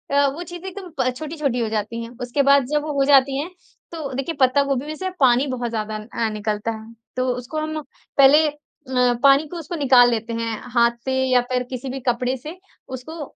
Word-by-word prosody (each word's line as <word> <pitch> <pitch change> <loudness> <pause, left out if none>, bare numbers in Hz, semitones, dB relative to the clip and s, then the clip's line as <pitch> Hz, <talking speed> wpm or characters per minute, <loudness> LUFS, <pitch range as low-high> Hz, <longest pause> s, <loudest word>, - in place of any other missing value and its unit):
अ, 285 0 +5
वो 345 - -5
चीज़ें 350 +2 -9
एकदम 375 -1 -9
प 255 -1 +2
छोटी-छोटी 300 -5 -2
हो 225 - -1
जाती 220 +2 -3
हैं। 230 - -8
उसके 245 +3 0
बाद 280 -2 +5
जब 295 - +2
वो 300 -1 -3
हो 275 - +4
जाती 275 -1 +5
हैं, 315 - -3 0.4
तो 315 -5 -5
देखिए, 275 +5 -3
पत्ता 260 +2 +4
गोभी 275 -1 -1
में 310 +1 -5
से 375 +3 -3
पानी 260 0 +4
बहुत 245 -2 -3
ज़्यादा 215 -1 -3
अ, 220 +1 -3
निकलता 210 +1 -2
है। 220 +1 -9 0.2
तो 255 0 0
उसको 250 +5 -6
हम 310 0 -3 0.4
पहले 285 +3 +7
अ, 295 - -3 0.7
पानी 275 +2 +6
को 345 +3 -7
उसको 330 +2 -6
निकाल 255 -5 +6
लेते 230 0 -2
हैं, 230 -1 -2 0.2
हाथ 235 -1 +4
से 260 0 0
या 250 - +5
फिर 250 0 +1
किसी 255 +1 -5
भी 265 +1 -4
कपड़े 250 +2 +1
से। 310 +8 -9 0.4
उसको 310 +5 -8
265 Hz, 215 wpm, -22 LUFS, 235-300 Hz, 0.7 s, पहले